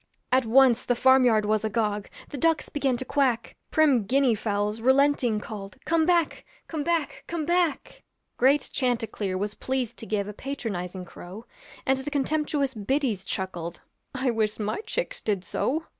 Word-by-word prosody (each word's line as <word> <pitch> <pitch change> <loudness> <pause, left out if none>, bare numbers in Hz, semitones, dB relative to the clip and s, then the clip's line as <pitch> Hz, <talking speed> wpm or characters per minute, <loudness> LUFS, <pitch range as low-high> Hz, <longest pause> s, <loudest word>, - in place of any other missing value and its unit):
At 255 -2 +3
once 250 0 +5
the 245 - +1
farm 260 +1 +5
yard 220 -3 +3
was 215 0 +1
agog; 210 -2 -1 0.2
The 285 - -6
ducks 325 +1 +2
began 275 -4 0
to 260 - -5
quack; 260 -5 0
Prim 280 -9 +3
Guinea 265 +2 +3
fowls 210 0 -1
relenting 265 -3 +3
called, 200 -3 -8
'Come 330 -1 +2
back, 345 -3 +2 0.2
come 310 -3 -3
back, 310 -5 -1
come 335 -3 -3
back.' 345 -2 0 0.3
Great 270 +3 +3
chanticleer 225 -6 -1
was 205 +2 -2
pleased 255 -1 -3
to 225 - -6
give 205 -2 -1
A 210 - -6
patronizing 195 -8 -5
crow, 185 +6 -10 0.4
And 265 0 +2
the 265 +2 -4
contemptuous 290 -1 0
biddies 225 -2 -1
chuckled, 175 -3 -4 0.3
'I 260 -1 +1
wish 215 -2 0
my 215 - -2
chicks - - -3
did 200 -4 -1
so.' 315 - -1
245 Hz, 160 wpm, -26 LUFS, 210-280 Hz, 0.4 s, once